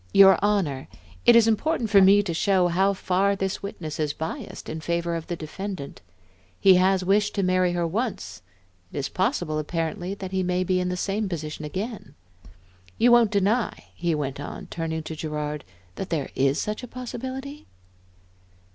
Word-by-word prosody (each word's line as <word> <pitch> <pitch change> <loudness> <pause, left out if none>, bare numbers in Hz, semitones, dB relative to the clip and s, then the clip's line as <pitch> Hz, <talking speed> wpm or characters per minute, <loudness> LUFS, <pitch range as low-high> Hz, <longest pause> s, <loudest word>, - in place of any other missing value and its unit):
"Your 195 -2 +8
Honor, 180 -11 0 0.4
it 235 - +9
is 230 -1 +6
important 225 +1 0
for 200 -2 +7
me 200 +2 +6
to 180 -4 -3
show 185 +1 +2
how 190 +3 +2
far 195 +1 +1
this 195 -1 -2
witness 160 -6 -6
is 150 -2 0
biassed 160 +1 -6
in 160 - -5
favor 170 +1 -1
of 165 -1 -4
the 175 - -2
defendant. 170 -1 -6 0.6
He 195 -1 +7
has 185 0 +3
wished 205 +2 +2
to 200 - +1
marry 185 -1 +2
her 175 -1 0
once, 180 - -3 0.5
it - - -7
is 140 - -2
possible, 180 - 0
apparently, 165 +4 -3
that 190 -2 -7
he 190 0 0
may 180 0 0
be 185 0 +1
in 180 0 -1
the 180 - -2
same 200 +2 -1
position 155 -3 -5
again. 210 +9 -5 0.8
You 240 +1 +5
won't 240 -2 +6
deny," 210 +3 0
he 170 -2 -1
went 140 -2 -3
on, 145 - -7
turning 160 -1 -3
to 160 - -6
Gerard, 150 -1 -4 0.2
" 90 0 -32
that 190 - -4
there 155 -5 -2
is 135 +2 +2
such 210 +2 -3
a 250 - -7
possibility?" 260 +4 -7
185 Hz, 180 wpm, -25 LUFS, 160-205 Hz, 0.8 s, it